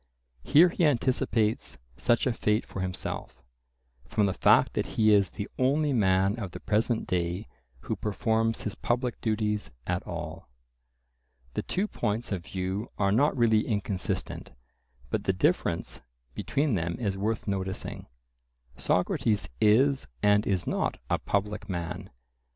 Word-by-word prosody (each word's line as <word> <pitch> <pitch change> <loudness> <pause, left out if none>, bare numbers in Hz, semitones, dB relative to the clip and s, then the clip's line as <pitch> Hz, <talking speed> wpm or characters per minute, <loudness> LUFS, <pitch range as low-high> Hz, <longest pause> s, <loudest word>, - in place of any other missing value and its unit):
Here 160 - +6
he 175 - -1
anticipates 120 - +1 0.2
such 120 - +2
a 130 - +2
fate 105 0 +1
for - - -7
himself, 95 -1 -5 0.6
from 105 - +2
the 95 - +1
fact - - +4
that - - -1
he 110 -1 +5
is 100 -2 +4
"the 100 - -5
only 140 +3 +2
man 95 -1 +2
of 100 -5 -5
the - - -6
present 110 +2 0
day 90 +3 -1 0.3
who - - -3
performs 110 +2 0
his 105 - -3
public 120 0 -2
duties 105 -2 -1 0.2
at 90 0 -1
all." - - -6 1.0
The - - -1
two 195 +3 -1
points 115 - -2
of 95 -4 -2
view 95 +4 -3
are 100 -1 +2
not 140 +7 +3
really 110 -2 +3
inconsistent, 100 - -3 0.6
but - - -1
the 95 - +2
difference 95 - 0 0.3
between 140 - 0
them 85 -3 -1
is 100 -5 -1
worth 105 +3 -2
noticing: 95 -1 -3 0.7
Socrates 105 +3 +1
is 130 - +4 0.2
and 105 +1 +4
is 95 -3 0
not - - -1
a - - +2
public 100 +1 -2
man. 85 -1 -4
105 Hz, 140 wpm, -28 LUFS, 95-120 Hz, 1.0 s, Here